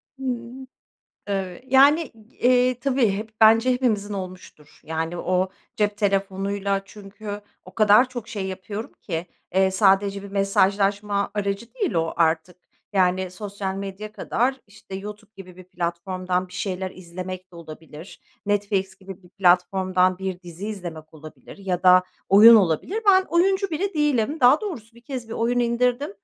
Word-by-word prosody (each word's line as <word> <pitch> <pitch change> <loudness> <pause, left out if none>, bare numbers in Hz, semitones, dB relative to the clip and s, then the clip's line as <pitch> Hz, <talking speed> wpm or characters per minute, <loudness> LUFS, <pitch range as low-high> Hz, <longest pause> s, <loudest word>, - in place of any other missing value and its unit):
Hımm, 255 0 -5 0.6
evet. 195 +3 -4
Yani, 280 +5 +5
g 235 - -29
eee, 250 0 +3
tabii, 260 -5 +2
hep 210 +3 -4
bence 225 +3 +6
hepimizin 220 -5 0
olmuştur. 185 -5 -9
Yani 160 +2 -3
o 185 +2 0 0.3
cep 205 -1 0
telefonuyla, 195 -1 -1
çünkü 205 +1 -9 0.2
o - - -14
kadar 215 +3 +5
çok 240 -3 -7
şey 200 -3 -4
yapıyorum 190 +3 -6
ki, 170 -2 -4 0.3
eee, 190 0 +4
sadece 195 0 +2
bir 200 - -10
mesajlaşma 200 +1 +1
aracı 200 +2 -3
değil 415 -9 -2
o 165 0 0
artık. 165 +1 +1 0.4
Yani 185 -1 +1
sosyal 195 0 -5
medya 200 +2 -7
kadar, 260 +4 -1
işte, 205 -1 -13
YouTube 210 +2 -8
gibi 185 -2 -12
bir 185 - -12
platformdan 180 +1 -3
bir - - -17
şeyler 185 0 -3
izlemek 185 +1 -8
de - - -13
olabilir. 160 +1 -11 0.3
Netflix 200 -2 -1
gibi 190 0 -11
bir 180 - -18
platformdan 185 0 +2
bir 190 -2 -4
dizi 175 +2 -8
izlemek 165 -6 -8
olabilir 155 0 -13
ya 185 -2 -3
da 185 0 +7 0.3
oyun 215 +4 +9
olabilir. 205 - +1
Ben 380 -1 +7
oyuncu 380 +3 +2
biri 375 +5 -2
değilim. 295 -1 0
Daha 255 +4 +6
doğrusu, 240 - -7
bir 235 - -17
kez 245 -1 -7
bir - - -7
oyun 235 +2 0
indirdim. 245 +3 +1
200 Hz, 150 wpm, -23 LUFS, 185-230 Hz, 0.6 s, oyun